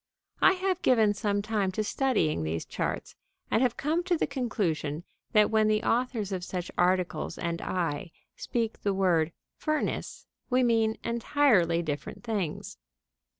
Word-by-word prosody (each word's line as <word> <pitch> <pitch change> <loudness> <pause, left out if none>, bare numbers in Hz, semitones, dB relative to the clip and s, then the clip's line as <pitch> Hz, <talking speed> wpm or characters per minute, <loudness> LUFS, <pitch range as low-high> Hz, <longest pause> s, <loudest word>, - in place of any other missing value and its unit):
I 380 - +7
have 375 -1 -1
given 220 -5 +4
some 205 -1 -1
time 210 -3 0
to 215 - -1
studying 210 - +1
these 80 +1 -2
charts, - - -3 0.4
and - - +3
have 250 -3 +1
come 320 +4 0
to 360 -2 +2
the - - +1
conclusion 185 - -2 0.3
that 210 0 +5
when 220 -1 +4
the 215 +1 +2
authors 230 -5 0
of 185 -2 -3
such 180 -1 -4
articles 180 0 +1
and 170 -1 -3
I 170 -1 -2 0.2
speak 230 -2 -2
the 200 -1 0
word 170 -4 +2 0.3
"furnace," 310 0 -2 0.2
we 255 0 +3
mean 225 -2 +2
entirely 230 - +2
different 150 +5 -5
things. 205 -9 -3
210 Hz, 150 wpm, -28 LUFS, 175-245 Hz, 0.4 s, I